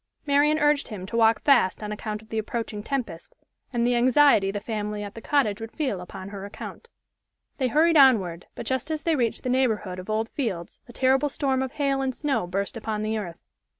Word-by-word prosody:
Marian 290 +1 +3
urged 295 -1 +2
him 200 -5 -7
to 215 - -6
walk 225 -1 +4
fast 240 -8 +3
on 210 - -4
account 210 0 -5
of 220 - -21
the 220 - -1
approaching 220 -1 -4
tempest, 235 -9 -4 0.4
and 240 -2 0
the 245 - +2
anxiety 250 -4 +5
the 205 +1 -3
family 210 -1 -4
at 205 0 -7
the 225 - -9
cottage 225 -6 +1
would 225 0 -6
feel 260 - -2
upon 185 +2 -8
her 200 -1 -7
account. 205 - -9 0.7
They 260 - +2
hurried 320 +5 +4
onward, 195 - +4
but - - -6
just 260 +2 -2
as 310 -1 -3
they 330 -2 +2
reached 235 -5 -1
the 255 - -2
neighborhood 220 -8 0
of 185 - -9
Old 220 +1 -1
Fields 195 - -4
a - - -11
terrible 265 +4 +2
storm 270 -2 0
of 265 -1 -3
hail 275 -2 0
and 260 -2 -2
snow 280 - -1
burst 195 +5 -2
upon 215 -1 -3
the 220 0 -1
earth. 170 -5 -8
230 Hz, 215 wpm, -25 LUFS, 210-270 Hz, 0.7 s, anxiety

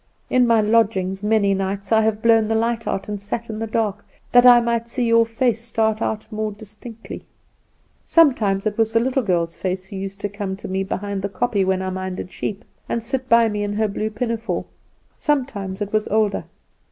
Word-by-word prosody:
In 250 -1 +4
my 230 -2 +4
lodgings, 205 -3 +1
many 210 -2 +2
nights 195 +1 -3
I 220 0 +5
have 220 0 0
blown 225 -2 +4
the 225 - 0
light 230 +1 0
out, 195 - -2
and 205 -1 -4
sat 225 +3 -4
in 215 - -5
the 225 - -3
dark, 210 -2 -1 0.3
that 245 0 +7
I 245 -1 +9
might 235 0 -1
see 250 +1 -2
your 230 0 +4
face 230 -1 0
start 220 -1 0
out 215 -1 -2
more 215 0 -2
distinctly. 215 +2 -10 0.8
Sometimes 225 - +3
it 215 +1 -2
was 225 0 +2
the 230 - +4
little 260 +3 +1
girl's 170 -6 -1
face 185 0 -2
who 195 - -10
used 195 +1 -6
to - - -1
come 200 -1 -4
to - - -8
me 190 +1 -1
behind 200 0 -3
the 200 - -2
kopje 200 +1 0
when 190 0 +1
I 185 - -2
minded 185 -1 -5
sheep, 210 +2 -5 0.2
and 230 - -1
sit 260 +2 -3
by 230 0 +6
me 210 -1 -2
in 205 0 -2
her 215 +1 +1
blue 210 +2 -2
pinafore; 225 -4 -3 0.5
sometimes 215 -9 -1
it 205 - -8
was 215 0 +1
older. 215 -2 +1
215 Hz, 205 wpm, -21 LUFS, 195-230 Hz, 0.8 s, I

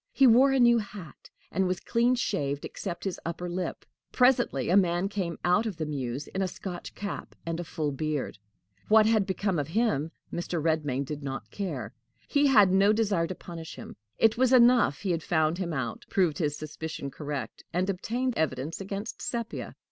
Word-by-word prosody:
He 275 - +4
wore 255 +3 +7
a 270 - +2
new 240 -1 +6
hat, 200 -8 -9 0.2
and 190 +2 +1
was 180 -1 -1
clean 240 +4 +2
shaved 145 - -1
except 175 -4 -6
his 195 -3 -3
upper 170 +1 -4
lip. 180 +1 -4 0.3
Presently 250 - +3
a - - +5
man 180 -1 +3
came 185 -5 -3
out 180 +6 +3
of 200 -6 -5
the 160 - -2
mews 135 -2 -3
in 190 - -3
a 190 - +1
Scotch 180 0 -7
cap 200 0 -6
and 165 0 -3
a - - -2
full 155 -2 -2
beard. 145 -5 -3 0.5
What 215 0 +6
had 215 -3 +3
become 190 -2 0
of 145 - -2
him 160 -6 +1 0.2
Mr. 175 0 -2
Redmain 150 -4 0
did 150 +2 -5
not 135 -1 -5
care. 145 - -4 0.3
He 285 0 +3
had 210 -8 +6
no 195 +2 +5
desire 200 -6 +1
to 185 - -5
punish 165 -2 -8
him. - - -9 0.2
It 225 +1 +3
was 260 -1 +4
enough 240 - +5
he 195 - -1
had 165 -1 0
found 160 +1 +1
him 175 -3 -2
out, 130 -6 -4
proved 175 -6 +1
his 150 -3 0
suspicion 155 -2 -6
correct, 145 -6 -5
and 180 +2 0
obtained 235 +7 -1
evidence 150 +2 -2
against 200 +3 -5
Sepia. 235 -1 -4
180 Hz, 190 wpm, -28 LUFS, 155-215 Hz, 0.5 s, wore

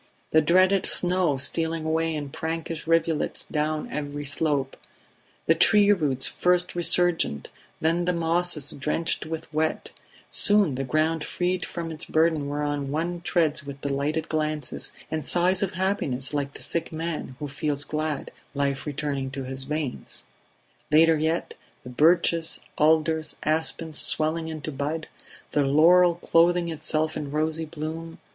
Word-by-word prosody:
The 160 - +5
dreaded 185 +4 +3
snow 180 -5 +3
stealing 160 +3 0
away 160 0 0
in 145 -2 -5
prankish 160 0 -5
rivulets 165 -1 0
down 155 0 -2
every 145 0 -5
slope; 145 -1 0 0.7
the 165 - +4
tree 205 +5 +4
roots 145 -9 +1
first 180 0 +1
resurgent, 175 - +5 0.3
then 170 +2 +1
the 180 - +1
mosses 170 -3 0
drenched 155 +3 -2
with 160 -1 -7
wet, 155 +1 -2 0.4
soon 205 -7 +4
the 135 +1 -3
ground 155 +4 0
freed 180 0 -2
from 165 -1 -5
its 160 0 -6
burden 155 -3 +1
whereon 145 -1 -3
one 170 +4 -3
treads 160 -4 0
with 140 -1 -9
delighted 145 +3 -2
glances 155 -3 -2 0.2
and 155 -1 -2
sighs 180 +5 +3
of 195 -2 -1
happiness 185 -9 -1
like 140 -1 -3
the - - -7
sick 170 -1 -3
man 160 -5 -5
who 145 - -5
feels 145 0 -2
glad 155 -1 -4 0.2
life 140 0 -2
returning 140 -2 -3
to 135 0 -6
his 130 +1 -4
veins... 150 -2 -4 0.7
Later 160 +1 +5
yet, 160 +2 -1 0.3
the 125 - -9
birches, 165 +3 +2 0.2
alders, 160 +1 +2
aspens 160 0 0
swelling 160 +1 +1
into 155 -1 -6
bud; 150 +3 -4 0.4
the 145 - +1
laurel 170 +5 +5
clothing 170 0 +2
itself 155 0 -2
in 145 - -5
rosy 155 +2 -1
bloom 160 +1 -7
155 Hz, 140 wpm, -25 LUFS, 145-165 Hz, 0.7 s, The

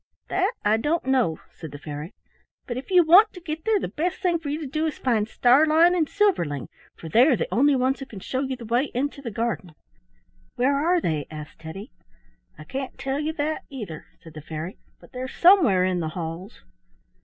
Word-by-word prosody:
"That 385 +5 +1
I 210 +1 +4
don't 300 +7 -1
know," 255 -12 +2
said 160 - -9
the 145 - -8
fairy, 150 +3 -7 0.5
"but 240 - -4
if 255 - -7
you 365 -2 +6
want 375 +7 +6
to 360 - -9
get 320 -2 -6
there 440 -2 +3
the - - -3
best 350 +4 -2
thing 350 -3 +1
for 310 -3 -6
you 295 +2 -2
to - - -4
do 310 +4 -1
is 310 - -4
find 225 -5 0
Starlein 310 +9 +4
and 320 -4 +1
Silverling, 335 - 0 0.3
for 165 - -10
they 235 - +5
are 280 - +4
the - - -2
only 280 +4 +4
ones 260 +1 +1
who 270 - -7
can 215 -7 -9
show 260 +7 -3
you 265 -1 -2
the 240 -2 -10
way 240 +5 +1
into 280 +2 -2
the 250 - -5
garden." 220 -7 -3 0.8
"Where 270 +3 +2
are 340 +5 +2
they?" 155 - -2
asked 155 -1 -9
Teddy. 190 - -9 0.7
"I 155 - -10
can't 265 - -6
tell 270 +1 -2
you 305 +1 -1
that, 310 0 -2
either," 210 - -8 0.2
said 160 - -13
the 155 - -9
fairy, 160 +4 -7 0.2
"but - - -18
they're 255 +1 -5
somewhere 285 - +5
in 185 -1 0
the 160 -2 -2
halls." 165 - -7
260 Hz, 210 wpm, -24 LUFS, -, 0.8 s, you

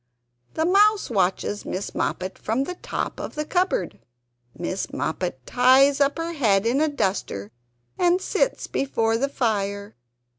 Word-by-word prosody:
The 320 - +1
Mouse 410 - +4
watches 195 0 0
Miss 190 +2 -4
Moppet 185 +1 -2
from 230 +5 0
the 360 - -4
top - - -4
of - - -6
the 300 0 -2
cupboard. 355 - 0 0.6
Miss 185 +2 -3
Moppet 160 -6 -3
ties 270 +3 +4
up 280 +2 +2
her 330 +1 -3
head 215 -9 +2
in 250 +5 +2
a 315 - +3
duster 190 - -2 0.5
and 355 0 +3
sits - - 0
before 225 -4 0
the 275 +2 0
fire. 200 -5 -2
250 Hz, 145 wpm, -24 LUFS, 195-310 Hz, 0.6 s, Mouse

